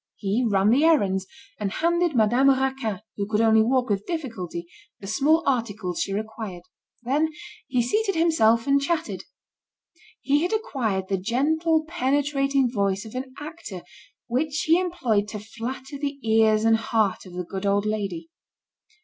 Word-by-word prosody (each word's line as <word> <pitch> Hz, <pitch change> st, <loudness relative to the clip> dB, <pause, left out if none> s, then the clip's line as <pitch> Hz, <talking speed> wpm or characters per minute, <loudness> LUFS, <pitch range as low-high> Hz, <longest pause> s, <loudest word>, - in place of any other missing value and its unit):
He 205 Hz, +4 st, -1 dB
ran 200 Hz, +1 st, +3 dB
the 270 Hz, +6 st, +4 dB
errands, 195 Hz, -, +3 dB, 0.3 s
and 200 Hz, -2 st, -2 dB
handed 340 Hz, -1 st, +1 dB
Madame 240 Hz, +5 st, +4 dB
Raquin, 265 Hz, -6 st, 0 dB, 0.2 s
who 200 Hz, -1 st, -2 dB
could 210 Hz, 0 st, 0 dB
only 220 Hz, -1 st, +5 dB
walk 250 Hz, +2 st, +2 dB
with 200 Hz, -1 st, -1 dB
difficulty, 225 Hz, -, -4 dB, 0.3 s
the -, -, -10 dB
small 290 Hz, -, +2 dB
articles 220 Hz, -9 st, -1 dB
she -, -, -2 dB
required. 215 Hz, -3 st, -5 dB, 0.4 s
Then 290 Hz, +6 st, +1 dB, 0.4 s
he 250 Hz, -2 st, +1 dB
seated 405 Hz, -, 0 dB
himself 235 Hz, -9 st, +3 dB
and 280 Hz, 0 st, +3 dB
chatted. 330 Hz, +3 st, -2 dB, 0.9 s
He 285 Hz, +2 st, +1 dB
had 355 Hz, +5 st, -1 dB
acquired 240 Hz, -, -1 dB
the 195 Hz, -1 st, -1 dB
gentle 315 Hz, -, +1 dB
penetrating 275 Hz, -4 st, +1 dB
voice 200 Hz, -2 st, 0 dB
of 220 Hz, -, -10 dB
an 260 Hz, +1 st, -5 dB
actor 295 Hz, -, -8 dB, 0.4 s
which 285 Hz, +5 st, -1 dB
he 330 Hz, +2 st, +5 dB
employed 250 Hz, -, 0 dB
to 210 Hz, 0 st, -6 dB
flatter 255 Hz, +6 st, -7 dB
the 285 Hz, -1 st, -3 dB
ears 220 Hz, 0 st, +4 dB
and 225 Hz, 0 st, +5 dB
heart 220 Hz, -4 st, 0 dB
of 180 Hz, -, -12 dB
the 180 Hz, 0 st, -3 dB
good 190 Hz, +3 st, -4 dB
old 200 Hz, +1 st, +2 dB
lady. 195 Hz, -6 st, -3 dB
235 Hz, 155 wpm, -24 LUFS, 205-290 Hz, 0.9 s, only